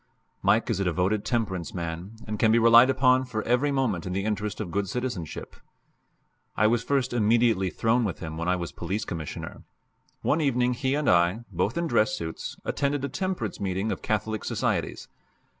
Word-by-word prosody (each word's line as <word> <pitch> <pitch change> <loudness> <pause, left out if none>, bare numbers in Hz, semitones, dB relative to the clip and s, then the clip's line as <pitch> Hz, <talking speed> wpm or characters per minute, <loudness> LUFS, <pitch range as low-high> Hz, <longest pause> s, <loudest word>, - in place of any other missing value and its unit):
Mike - - +3
is - - -1
a - - +1
devoted 95 +4 0
temperance 95 -9 -2
man, 85 +3 -5
and 105 -1 -4
can 110 - +4
be 115 - +5
relied 115 +2 +7
upon 130 -1 +4
for 115 -4 -4
every 125 +5 +2
movement 120 -11 0
in 90 - -3
the 100 +2 -1
interest 105 -1 -2
of 100 -6 -4
good 100 +1 -1
citizenship. 120 - -4 1.0
I 110 - +4
was 115 +1 +3
first 130 -1 0
intimately 115 -4 +3
thrown 115 +5 +1
with 100 -6 -2
him 80 -2 -6
when 85 +2 -3
I 90 - +3
was 85 -2 -4
Police 95 +5 -3
Commissioner. 80 -5 -6 0.6
One 160 - +2
evening 125 -3 +2
he 130 +2 0
and 150 -2 -1
I 90 +5 +3
both - - -1
in 170 - 0
dress 110 -7 +2
suits 80 -1 -6
attended 140 0 -1
a - - -4
temperance 175 - -3
meeting 95 +2 -1
of - - -4
Catholic 110 0 -2
societies. - - -2
110 Hz, 185 wpm, -26 LUFS, 95-125 Hz, 1.0 s, relied